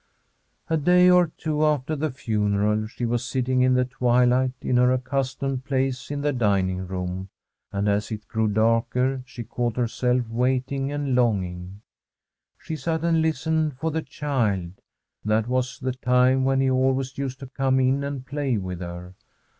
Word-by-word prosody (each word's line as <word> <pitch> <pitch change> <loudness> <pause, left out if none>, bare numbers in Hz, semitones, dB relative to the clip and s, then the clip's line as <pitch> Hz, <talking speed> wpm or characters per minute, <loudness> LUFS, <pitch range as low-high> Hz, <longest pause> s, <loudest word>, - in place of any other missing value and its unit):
A 160 -2 +1
day 180 +4 +5
or 180 -1 +5
two 155 -1 -1
after 150 0 +1
the 155 +1 -1
funeral 105 -3 0
she 120 +2 -4
was 120 +1 0
sitting 130 0 0
in 130 0 +4
the 125 0 +3
twilight 125 +1 +2
in 125 - 0
her 125 0 +4
accustomed 130 0 -2
place 130 -2 -1
in 145 0 -3
the 145 0 0
dining 95 -6 0
room, 90 +1 -4 0.4
and 100 0 -1
as 100 0 +1
it 105 -1 -6
grew 110 -1 0
darker 115 +5 +1
she 125 -1 -7
caught 120 +1 -3
herself 125 0 0
waiting 130 +3 -1
and 145 -2 -2
longing. 95 -5 -1 0.8
She 160 -2 -6
sat 160 +3 -2
and 165 -1 +2
listened 160 -2 0
for 160 +4 -2
the 160 +1 -1
child; 110 - -1 0.5
that 110 +1 +1
was 125 0 -1
the 130 -1 -2
time 125 +1 +3
when 135 0 +2
he 135 -1 +2
always 130 +1 0
used 135 -1 -3
to - - -6
come 130 0 0
in 130 +2 +2
and 140 -2 -4
play 140 -3 -1
with 90 -3 -5
her. 90 +1 -7
125 Hz, 165 wpm, -24 LUFS, 110-135 Hz, 0.8 s, day